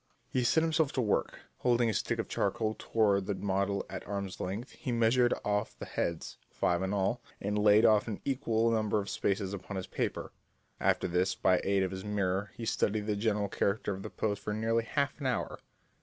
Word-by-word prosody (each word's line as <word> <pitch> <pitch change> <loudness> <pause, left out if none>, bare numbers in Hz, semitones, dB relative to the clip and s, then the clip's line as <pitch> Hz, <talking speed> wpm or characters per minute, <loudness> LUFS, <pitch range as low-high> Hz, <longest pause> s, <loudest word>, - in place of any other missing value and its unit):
He 125 - +1
set 160 +7 +3
himself 160 -3 +2
to 130 - +1
work. 105 -4 0 0.2
Holding 120 -1 +3
his 110 -3 +1
stick - - -2
of - - -2
charcoal 110 -1 0
toward 100 -4 +2
the 100 - 0
model 100 +1 -1
at - - -6
arm's 100 -2 -4
length, 100 +7 -4
he 125 - -5
measured 120 +1 +3
off 105 +1 -1
the - - -6
heads, 85 -1 -3
five 85 0 0
in 95 0 -1
all, 100 +5 0 0.2
and 100 +1 -2
laid 105 +1 +5
off 110 -1 +5
an 105 -3 -4
equal 115 -4 +1
number 110 -1 +1
of 100 -1 -4
spaces 100 0 -1
upon 100 0 -5
his 95 - -3
paper. - - -3 0.5
After - - +2
this, 90 +2 +1
by 90 -1 +3
aid 100 -1 +2
of 95 - -1
his 95 0 -5
mirror, 100 -1 -1
he 115 - -6
studied 105 -1 0
the 105 -1 0
general 105 -1 0
character 100 +1 0
of 95 - -7
the 110 - -6
pose 105 -2 -2
for 105 - -3
nearly 115 +1 +1
half 140 +4 -1
an 135 - 0
hour. 125 - -2
105 Hz, 205 wpm, -31 LUFS, 100-115 Hz, 0.5 s, laid